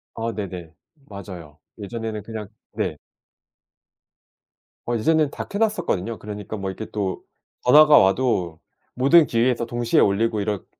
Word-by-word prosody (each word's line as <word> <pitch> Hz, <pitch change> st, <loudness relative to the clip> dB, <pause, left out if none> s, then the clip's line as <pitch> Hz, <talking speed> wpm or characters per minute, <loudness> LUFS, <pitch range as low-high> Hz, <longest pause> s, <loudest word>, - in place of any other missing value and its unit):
아 115 Hz, 0 st, -3 dB
네네. 90 Hz, -5 st, -6 dB, 0.4 s
맞아요. 90 Hz, -7 st, -10 dB, 0.2 s
예전에는 110 Hz, 0 st, -5 dB
그냥 110 Hz, -1 st, -7 dB, 0.2 s
네. -, -, -3 dB, 1.9 s
어 120 Hz, -, -1 dB
이제는 155 Hz, +5 st, +2 dB
다 -, -, -6 dB
켜 200 Hz, -, -4 dB
놨었거든요. 115 Hz, -, -1 dB
그러니까 105 Hz, 0 st, -7 dB
뭐 95 Hz, -1 st, -4 dB
이렇게 110 Hz, +3 st, -8 dB
또 100 Hz, -3 st, -3 dB, 0.4 s
전화가 150 Hz, +4 st, +7 dB
와도 95 Hz, -5 st, +1 dB, 0.3 s
모든 145 Hz, +6 st, +5 dB
기기에서 120 Hz, 0 st, +1 dB
동시에 120 Hz, 0 st, +1 dB
울리고 105 Hz, +2 st, +1 dB
이렇게 100 Hz, -1 st, -3 dB
110 Hz, 295 characters per minute, -22 LUFS, 100-120 Hz, 1.9 s, 전화가